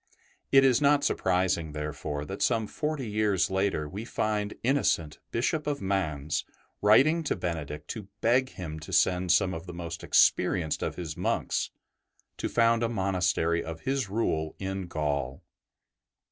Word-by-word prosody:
It 135 0 +7
is 130 0 +4
not 145 0 +4
surprising, 90 -4 +1
therefore, 75 -1 -4
that 95 +5 -6
some 115 -3 +2
forty 150 +2 -3
years 105 -3 +1
later 95 -5 0
we 100 +8 -6
find 105 -3 -2
Innocent, 115 - +1
Bishop 150 +6 -1
of 145 -1 -1
Mans, 80 - -1 0.4
writing 135 +11 +5
to - - 0
Benedict 75 -3 -4
to 105 -4 -6
beg 130 +3 +3
him 80 -7 -7
to 80 - -10
send 90 -1 +3
some 90 +2 +3
of 80 +2 -7
the 90 - -7
most 85 -1 -6
experienced 80 -5 +3
of - - -2
his 80 -4 -5
monks - - -1 0.7
to - - -2
found 115 0 +3
a 115 - +1
monastery 90 -5 +1
of 80 0 -7
his 135 -5 -1
Rule 80 -7 -1
in 95 -1 -4
Gaul. 70 -4 -2
95 Hz, 150 wpm, -28 LUFS, 80-115 Hz, 0.7 s, It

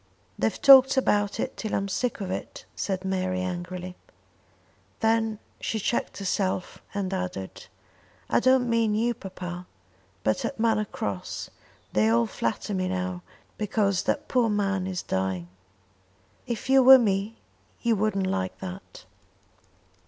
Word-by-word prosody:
"They've 110 - 0
talked 270 -1 +8
about 205 -6 +1
it - - -2
till 220 - -3
I'm 195 - -1
sick 235 +3 -2
of 185 -2 -3
it," - - -6
said 190 -1 -3
Mary 185 -1 -1
angrily. 180 0 -5 1.0
Then 225 -1 +1 0.2
she 225 - -2
checked 235 - -1
herself 190 -1 -2
and 195 -1 -2
added 180 - -5 0.6
"I - - +3
don't 255 0 +4
mean 230 -2 +2
you, 235 +2 +1
papa; 180 -3 -7 0.6
but 110 - +1
at 275 - -4
Manor 220 -2 +2
Cross 100 - -5 0.4
they 110 +1 +3
all 115 +1 +3
flatter 115 - -3
me 185 -1 0
now, 185 -1 -3 0.4
because 200 -2 +1
that 290 - -1
poor 245 -3 +2
man 200 -3 0
is 185 -2 -3
dying. 95 -2 -2 1.0
If 235 -1 -4
you 265 0 +6
were 265 +1 +10
me 210 -1 0 0.5
you 235 -1 +3
wouldn't 195 -2 0
like 95 - -2
that." 190 +1 -9
195 Hz, 140 wpm, -26 LUFS, 185-225 Hz, 1.0 s, were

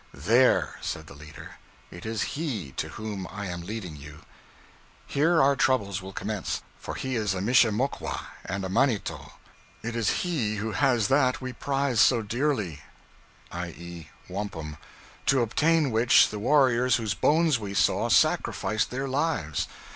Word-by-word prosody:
'There,' 115 - +3
said - - -4
the - - -12
leader, 75 +3 -12 0.3
'it 85 +5 -9
is 110 -2 -1
he 120 - -3
to - - -4
whom 105 -4 -5
I 100 +2 -5
am 85 -2 -5
leading 95 -3 -6
you; 75 +2 -11 0.8
here 160 +4 +2
our 140 -1 +4
troubles 100 -8 +1
will 95 +1 -8
commence, 105 0 -3 0.2
for - - -6
he 130 -1 -3
is 105 -4 0
a - - -2
mishemokwa 120 +4 +1 0.2
and 95 +1 -4
a - - -2
manito. 115 +2 0 0.5
It 115 +1 -4
is 115 -3 +1 0.2
he 125 -12 -1
who 110 +2 -3
has 120 -5 +2
that 130 -2 +3
we 130 -1 -5
prize 135 -2 -1
so 120 -3 +4
dearly 110 - -1 0.7
(i.e. 85 -1 -7 0.2
wampum), 90 -6 -5 0.5
to 135 -3 +4
obtain 150 +5 +2
which, 115 +2 +5
the 105 - -5
warriors 125 0 +3
whose 110 -4 -1
bones 155 - +3
we 100 -2 -6
saw, - - +2
sacrificed 110 0 +2
their 135 +2 -3
lives. 135 - -1
110 Hz, 150 wpm, -27 LUFS, 95-130 Hz, 0.8 s, which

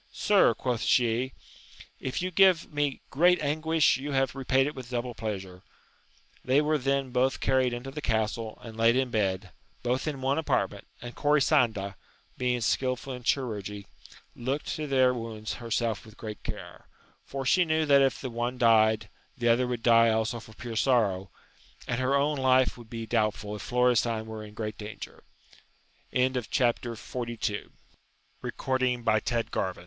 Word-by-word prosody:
Sir, 200 - +3
quoth 125 -1 -2
she, 125 +1 +2 0.7
if 130 +6 -3
you 185 - -2
gave 185 -4 +4
me 145 -2 -1
great 180 +5 +4
anguish 155 0 +2
you 140 +2 -5
have 135 -2 +1
repaid 135 0 +2
it 150 - -3
with 130 -4 -9
double 125 0 -3
pleasure. 95 -5 -5 0.8
They 130 +2 +3
were 150 0 +1
then 135 0 0
both 130 +2 +1
carried 130 -1 +2
into 120 +3 -5
the 150 +2 -6
castle 110 -2 -1
and 115 -2 -9
laid 115 +1 +4
in 130 -1 0
bed, 95 -3 -1 0.3
both 125 +4 -1
in 145 -3 -3
one 135 +3 +1
apartment, 160 - -1 0.2
and 120 0 -7
Corisanda, 130 - +2 0.4
being 125 -1 0
skilful 130 +3 -1
in 125 - -7
chirurgery, 105 -6 -2 0.5
looked 135 +5 -3
to 155 -1 -4
their 130 -2 +4
wounds 115 -3 -5
herself 115 -2 -1
with 110 -1 -15
great 105 -2 -7
care; - - -8 0.4
for 135 -1 -5
she 180 +7 +4
knew 160 -1 +1
that 140 -2 +5
if 135 -1 +2
the 130 - -5
one 120 +2 -2
died, 110 -2 +4 0.3
the 120 -2 +1
other 120 +2 +3
would 120 -2 -3
die 115 -1 +6
also 110 +1 0
for 110 -1 -14
pure 120 -1 -7
sorrow, 105 -7 +2 0.6
and 120 - -1
her 130 +2 +2
own 145 +1 +1
life 130 0 +3
would 120 -2 -13
be 115 -1 -5
doubtful 105 -2 -1
if 105 - -7
Florestan 120 -2 +2
were 110 -1 -7
in 105 0 -12
gr 110 -1 -3
125 Hz, 150 wpm, -28 LUFS, 110-135 Hz, 0.8 s, die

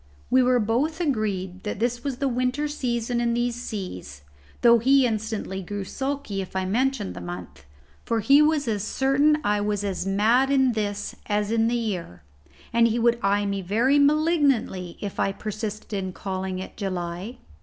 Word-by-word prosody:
We 260 +1 +6
were 250 0 +4
both 250 +9 0
agreed 205 - -1
that 210 - -4
this 240 +2 -1
was 275 -3 -3
the 275 +1 0
winter 255 +4 0
season 240 -4 -1
in 235 -1 +1
these 240 0 0
seas, 185 - -6 0.4
though 235 -1 +6
he 265 +3 +4
instantly 215 -4 -2
grew 200 +2 -5
sulky 265 -3 -3
if 190 - -9
I 190 0 0
mentioned 245 - 0
the 90 - -8
month, 90 -2 -8 0.4
for 230 -1 0
he 275 +7 +5
was 300 -3 +2
as 210 -3 -1
certain 275 +6 +2
I 205 0 +1
was 205 -1 -1
as 195 -2 -2
mad 225 +7 +3
in 265 -2 +4
this, 205 -2 -3
as 210 0 0
in 225 0 +2
the 240 - +1
year, 180 - -4 0.5
and 230 0 +5
he 230 +1 0
would 235 0 +2
eye 200 +1 +2
me 200 -1 -2
very 235 +10 +2
malignantly 285 - +2
if 200 -2 -5
I 195 - +2
persisted 215 +1 -5
in 190 -2 -3
calling 190 -1 -4
it 185 - -8
July. 185 +2 -4
220 Hz, 175 wpm, -25 LUFS, 195-255 Hz, 0.5 s, We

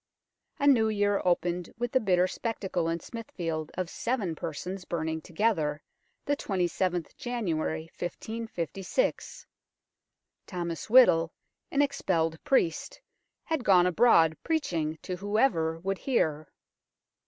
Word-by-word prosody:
A 280 - -1
new 235 -6 +5
year 205 -1 +1
opened 175 -1 0
with 240 0 -2
the 260 - +4
bitter 185 -5 +3
spectacle 185 -5 -2
in 165 0 -1
Smithfield 165 -9 -5
of 185 -1 -2
seven 215 -2 -2
persons 180 +5 -5
burning 160 -2 -3
together, 160 -5 0 0.4
the 290 - +1
27th 180 - -1
January 175 - -2 0.2
1556. 205 - -3 1.0
Thomas 170 -1 -4
Whittle, 170 -10 +6 0.4
an 285 0 +3
expelled 165 - -1
priest, 170 -12 +1 0.4
had 320 -6 -2
gone 185 -4 +5
abroad 175 -4 +5
preaching 165 - -1
to 180 -1 -4
whoever 200 -5 +1
would 195 +3 -3
hear. 155 - 0
180 Hz, 110 wpm, -29 LUFS, 165-225 Hz, 1.0 s, Whittle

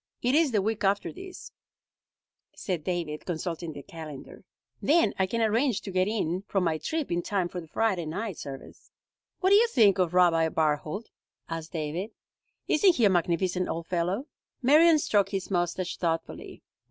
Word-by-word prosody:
"It 250 +2 +2
is 310 -2 +4
the 210 -4 +1
week 220 +1 -2
after 200 +1 +1
this," 375 0 -10 1.0
said 180 -5 -3
David, 170 -4 -3
consulting 170 -1 -4
the 140 - -9
calendar. 155 -4 -10 0.4
"Then 330 +3 +3
I 190 - +2
can 230 +4 -1
arrange 230 +2 +1
to 195 - -7
get 185 0 +1
in 190 -5 -1
from 195 -2 0
my 160 -2 0
trip 315 - -3
in 175 0 +1
time 190 -1 -1
for 180 0 -6
the 165 - -13
Friday 185 -1 0
night 195 +3 -4
service." 135 -1 -10 0.5
"What 375 0 +3
do 400 - +8
you 470 +2 +5
think 210 - +4
of 180 -1 +1
Rabbi 165 -3 +4
Barthold?" 155 +6 -1 0.4
asked 165 0 -6
David. 165 +5 -3 0.6
"Isn't 360 +3 +4
he 235 - +3
a 200 - +5
magnificent 180 +1 0
old 165 0 -3
fellow?" 180 +8 -1 0.4
Marion 310 +5 +6
stroked 205 -9 +1
his 195 -1 -4
mustache 175 0 -1
thoughtfully. 165 -2 -4
185 Hz, 170 wpm, -27 LUFS, 165-225 Hz, 1.0 s, do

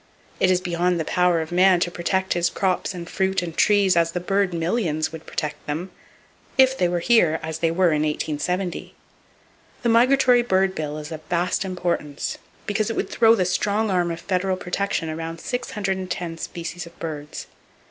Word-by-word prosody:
It 185 - +3
is 185 -1 +3
beyond 175 0 0
the 160 - -2
power 180 -1 +2
of 160 +1 -6
man 180 0 +5
to 175 - 0
protect 190 +2 0
his 175 0 +1
crops 190 0 -1
and 170 -1 -7
fruit 190 0 0
and 165 -2 -6
trees 205 -3 +4
as 165 -1 +2
the 180 - -1
bird 195 +1 +1
millions 165 -2 -1
would 160 -1 -10
protect 150 -2 -4
them—if 190 - -2
they 180 - +2
were 175 0 -1
here 170 -7 +4
as 160 0 -4
they 165 - +2
were 175 +2 +3
in 155 -2 +1
1870. 165 +4 -2 0.9
The 235 - +2
migratory 250 +1 +5
bird 190 -4 +2
bill 150 -3 -4
is 150 +1 -7
of 160 -1 -6
vast 180 +3 0
importance 175 -6 -3 0.3
because 215 +1 0
it 225 - -2
would - - -2
throw 225 -1 +5
the 185 -4 +1
strong 205 +4 0
arm 175 -2 +1
of 165 0 -4
federal 185 0 0
protection 180 -2 -2
around 165 +1 -5
610 190 -7 -3
species 170 +1 -6
of 170 - -16
birds. 150 -3 -6
180 Hz, 180 wpm, -23 LUFS, 165-195 Hz, 0.9 s, man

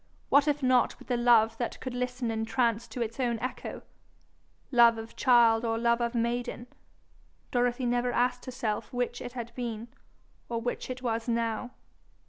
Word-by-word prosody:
What 285 +1 +5
if 295 -1 0
not 255 -1 +3
with - - -16
the 245 - +2
love 230 -2 +4
that 240 - -3
could 255 - -5
listen 250 -1 -2
entranced 225 +1 0
to 245 - -1
its 230 +3 -7
own 240 -3 +1
echo! 255 +3 -5 0.9
love 235 -2 +6
of 225 0 -8
child 235 -2 +5
or 225 -1 0
love 235 +1 +2
of 235 +1 -1
maiden, 240 +1 -1 0.9
Dorothy 245 0 +1
never 245 0 +1
asked 250 +1 0
herself 245 -5 -3
which 245 -1 -2
it 245 0 -7
had 235 -2 -6
been, 235 -2 -5 0.6
or 230 -1 -1
which 245 +2 -4
it 255 0 -6
was 230 -1 -1
now. 230 0 -1
240 Hz, 165 wpm, -29 LUFS, 230-250 Hz, 0.9 s, love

